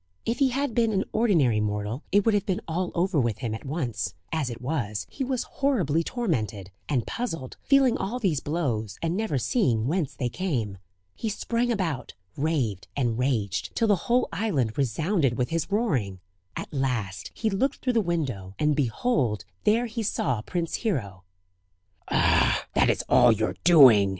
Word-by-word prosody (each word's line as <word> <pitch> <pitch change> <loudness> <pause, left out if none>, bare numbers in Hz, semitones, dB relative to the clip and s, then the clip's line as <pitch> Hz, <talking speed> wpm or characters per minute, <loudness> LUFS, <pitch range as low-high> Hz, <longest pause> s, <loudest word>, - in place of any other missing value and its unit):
If 230 +1 -1
he 275 -2 +4
had 275 0 -1
been 230 -1 +2
an 195 0 +1
ordinary 165 - +3
mortal 105 +4 -2
it 205 0 +4
would 225 - +4
have 205 -1 0
been 185 -2 0
all 175 +2 -2
over 175 -2 +1
with 120 -5 0
him 120 -4 -3
at 110 - -7
once; 135 - -3 0.2
as 155 -5 -1
it 120 -1 -6
was, 120 -6 -2
he 275 - -3
was 255 -1 -1
horribly 180 - 0
tormented, 110 - -2 0.2
and 125 -6 +1
puzzled 165 - -4
feeling 270 -3 +4
all 220 +6 -2
these 185 - +1
blows, 120 - -2
and 165 +1 0
never 210 -9 -1
seeing 120 - +1
whence 155 +1 -1
they 125 - -1
came. 120 - -2 0.3
He 220 - -3
sprang 235 +3 -1
about, 165 - -2 0.2
raved, 130 - -1
and 120 -4 0
raged, 110 -7 -1
till 230 - +2
the 205 - +5
whole 245 +1 +3
island 160 - 0
resounded 140 - +1
with 125 -1 0
his 165 +3 -1
roaring. 130 - 0 0.4
At - - -6
last 115 -9 -2
he 220 -2 -1
looked 265 +8 +1
through 255 - 0
the 230 - +3
window, 130 - -3
and 150 -1 +2
behold 125 - 0 0.2
there 225 +3 +3
he 230 0 -4
saw 125 - 0
Prince 170 +6 -3
Hero. 100 - -2 0.8
"Ah! - - +3
that - - +3
is - - +1
all 120 - +6
your 110 0 0
doing!" 130 - +7
150 Hz, 175 wpm, -26 LUFS, -, 0.8 s, doing